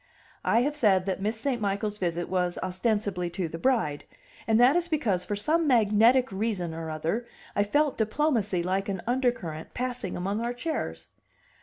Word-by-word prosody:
I 230 Hz, -, +3 dB
have 290 Hz, +4 st, 0 dB
said 195 Hz, -9 st, +3 dB
that 195 Hz, -1 st, -2 dB
Miss 215 Hz, +3 st, -1 dB
St. 245 Hz, -1 st, -1 dB
Michael's 205 Hz, +1 st, -1 dB
visit 175 Hz, -1 st, -1 dB
was 180 Hz, -1 st, 0 dB
ostensibly 185 Hz, -1 st, -1 dB
to 180 Hz, -3 st, 0 dB
the 165 Hz, +1 st, -7 dB
bride: 220 Hz, -, +1 dB, 0.4 s
and 225 Hz, 0 st, +4 dB
that 250 Hz, +5 st, +6 dB
is 350 Hz, 0 st, +1 dB
because 235 Hz, -, 0 dB
for 205 Hz, -, -3 dB
some 310 Hz, +10 st, +1 dB
magnetic 235 Hz, +1 st, +4 dB
reason 190 Hz, -4 st, -2 dB
or 165 Hz, 0 st, -5 dB
other 165 Hz, +10 st, -2 dB, 0.3 s
I 205 Hz, -, +3 dB
felt 290 Hz, +7 st, +1 dB
diplomacy 220 Hz, -, +1 dB
like 190 Hz, +3 st, -1 dB
an 190 Hz, -3 st, -3 dB
undercurrent 240 Hz, -, -1 dB
passing 250 Hz, -6 st, -3 dB
among 200 Hz, +5 st, -2 dB
our 240 Hz, +1 st, -2 dB
chairs. 315 Hz, +5 st, -4 dB
210 Hz, 170 wpm, -27 LUFS, 185-245 Hz, 0.4 s, that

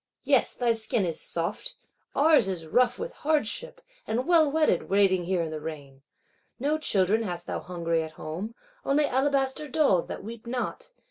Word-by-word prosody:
Yes, -, -, +2 dB
thy 240 Hz, -2 st, +2 dB
skin 225 Hz, -2 st, 0 dB
is 165 Hz, -2 st, -3 dB
soft: 170 Hz, 0 st, -3 dB, 0.4 s
ours 295 Hz, -7 st, +5 dB
is 180 Hz, -4 st, -3 dB
rough 245 Hz, +10 st, +2 dB
with 485 Hz, -, -5 dB
hardship; 315 Hz, -, -1 dB, 0.3 s
and 245 Hz, +3 st, -1 dB
well 325 Hz, -3 st, +5 dB
wetted, 305 Hz, -, +1 dB
waiting 190 Hz, -3 st, +3 dB
here 180 Hz, -1 st, 0 dB
in 160 Hz, -, -4 dB
the 155 Hz, -1 st, -5 dB
rain. 145 Hz, -4 st, -8 dB, 0.6 s
No 295 Hz, +4 st, 0 dB
children 205 Hz, -5 st, +2 dB
hast 175 Hz, -5 st, -4 dB
thou -, -, -3 dB
hungry 170 Hz, -2 st, -1 dB
at 160 Hz, 0 st, -6 dB
home; 175 Hz, +10 st, -6 dB, 0.3 s
only 290 Hz, +2 st, +3 dB
alabaster 270 Hz, +2 st, 0 dB
dolls, 270 Hz, -, +2 dB
that -, -, -6 dB
weep 230 Hz, +2 st, -9 dB
not! 255 Hz, -, -3 dB
225 Hz, 165 wpm, -27 LUFS, 175-285 Hz, 0.6 s, ours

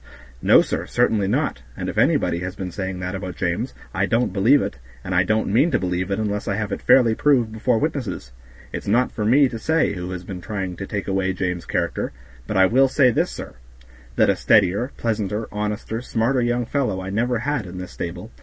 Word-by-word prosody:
"No, -, -, +6 dB
sir, -, -, -3 dB
certainly 105 Hz, -3 st, +2 dB
not; 135 Hz, +9 st, 0 dB, 0.2 s
and -, -, -4 dB
if -, -, -4 dB
anybody 85 Hz, -, +2 dB
has 90 Hz, +2 st, -5 dB
been 95 Hz, -2 st, -5 dB
saying 95 Hz, -1 st, -4 dB
that 90 Hz, 0 st, -3 dB
about 95 Hz, -2 st, -5 dB
James, 100 Hz, +10 st, -2 dB, 0.2 s
I 95 Hz, 0 st, +1 dB
don't 115 Hz, -3 st, +1 dB
believe 115 Hz, +9 st, +5 dB
it, 65 Hz, -, -4 dB, 0.2 s
and 95 Hz, -, -4 dB
I 90 Hz, -, +4 dB
don't 110 Hz, +1 st, 0 dB
mean 135 Hz, +9 st, +4 dB
to -, -, +2 dB
believe 90 Hz, 0 st, -2 dB
it 100 Hz, -, 0 dB
unless 105 Hz, -1 st, -2 dB
I 100 Hz, -, 0 dB
have 105 Hz, 0 st, -3 dB
it -, -, -3 dB
fairly 120 Hz, -4 st, +5 dB
proved 125 Hz, -3 st, +2 dB
before 110 Hz, +2 st, +1 dB
witnesses; 125 Hz, -, -3 dB, 0.4 s
it's -, -, -5 dB
not 120 Hz, +5 st, +2 dB
for 105 Hz, -, -4 dB
me 135 Hz, +5 st, +5 dB
to 115 Hz, -3 st, -6 dB
say 160 Hz, +6 st, +1 dB
who 90 Hz, -2 st, -5 dB
has 90 Hz, -1 st, -5 dB
been 90 Hz, 0 st, -7 dB
trying 95 Hz, -2 st, -4 dB
to 100 Hz, -, -6 dB
take 100 Hz, -4 st, -4 dB
away 95 Hz, -1 st, 0 dB
James' 90 Hz, -1 st, -3 dB
character, -, -, -2 dB, 0.3 s
but -, -, -1 dB
I 95 Hz, -, +7 dB
will 130 Hz, +7 st, +4 dB
say 130 Hz, -1 st, +4 dB
this, -, -, +1 dB
sir, -, -, -8 dB, 0.6 s
that -, -, +4 dB
a -, -, 0 dB
steadier, 105 Hz, +5 st, +3 dB
pleasanter, 110 Hz, -1 st, -2 dB
honester, 105 Hz, +2 st, -3 dB
smarter 125 Hz, +2 st, 0 dB
young 120 Hz, 0 st, 0 dB
fellow 125 Hz, -7 st, -1 dB
I 95 Hz, +1 st, -5 dB
never 120 Hz, +4 st, 0 dB
had 125 Hz, -3 st, -2 dB
in 90 Hz, +1 st, -8 dB
this 90 Hz, -1 st, -7 dB
stable. 90 Hz, +6 st, -6 dB
105 Hz, 220 wpm, -22 LUFS, 95-120 Hz, 0.6 s, I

